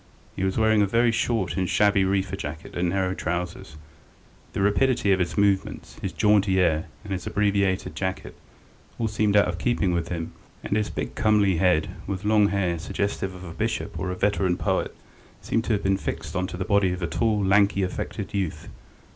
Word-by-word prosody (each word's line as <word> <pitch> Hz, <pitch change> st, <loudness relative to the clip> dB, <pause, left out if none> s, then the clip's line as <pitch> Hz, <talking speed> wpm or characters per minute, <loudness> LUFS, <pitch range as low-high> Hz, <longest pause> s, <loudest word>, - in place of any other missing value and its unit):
He -, -, -3 dB
was 95 Hz, 0 st, 0 dB
wearing 110 Hz, -1 st, +4 dB
a 100 Hz, -, +3 dB
very 115 Hz, +3 st, +3 dB
short 115 Hz, -4 st, 0 dB
and 95 Hz, -1 st, -1 dB
shabby 100 Hz, -2 st, +3 dB
reefer 95 Hz, 0 st, 0 dB
jacket 80 Hz, -3 st, -7 dB
and 85 Hz, 0 st, 0 dB
narrow 95 Hz, 0 st, 0 dB
trousers; 85 Hz, -3 st, -4 dB, 0.8 s
the -, -, -2 dB
rapidity 105 Hz, +1 st, +2 dB
of 95 Hz, -, +3 dB
his 90 Hz, +2 st, -2 dB
movements, 100 Hz, -1 st, 0 dB
his 95 Hz, -, -3 dB
jaunty 95 Hz, +2 st, +3 dB
air, 80 Hz, -2 st, +2 dB, 0.2 s
and 100 Hz, -2 st, -5 dB
his 90 Hz, -2 st, -4 dB
abbreviated 100 Hz, -2 st, +1 dB
jacket 95 Hz, -1 st, -4 dB, 0.6 s
all 115 Hz, -, 0 dB
seemed 105 Hz, -1 st, +2 dB
out 100 Hz, -, +5 dB
of 90 Hz, -1 st, -3 dB
keeping 100 Hz, -6 st, +1 dB
with 85 Hz, -1 st, -1 dB
him, 85 Hz, -2 st, -4 dB, 0.3 s
and -, -, -1 dB
his 105 Hz, 0 st, 0 dB
big -, -, -4 dB
comely 105 Hz, -4 st, +3 dB
head, 85 Hz, -3 st, +2 dB, 0.2 s
with 95 Hz, 0 st, -4 dB
long 105 Hz, -1 st, +4 dB
hair 95 Hz, -4 st, 0 dB
suggestive 95 Hz, +2 st, -3 dB
of 90 Hz, -, -10 dB
a 85 Hz, -3 st, -8 dB
bishop -, -, -3 dB
or 95 Hz, -, -2 dB
a 90 Hz, -, -2 dB
veteran 95 Hz, -2 st, +1 dB
poet, -, -, -1 dB, 0.4 s
seemed 115 Hz, 0 st, -1 dB
to 115 Hz, -, +1 dB
have 100 Hz, -, -1 dB
been 95 Hz, 0 st, +2 dB
fixed 80 Hz, -3 st, -5 dB
on 90 Hz, 0 st, 0 dB
to 90 Hz, -, -7 dB
the 90 Hz, -, -3 dB
body 100 Hz, -3 st, +3 dB
of 90 Hz, 0 st, -4 dB
a -, -, 0 dB
tall, 110 Hz, +1 st, +1 dB
lanky, 100 Hz, 0 st, +3 dB
affected 90 Hz, -, -4 dB
youth. 95 Hz, -5 st, -3 dB
95 Hz, 195 wpm, -25 LUFS, 90-105 Hz, 0.8 s, out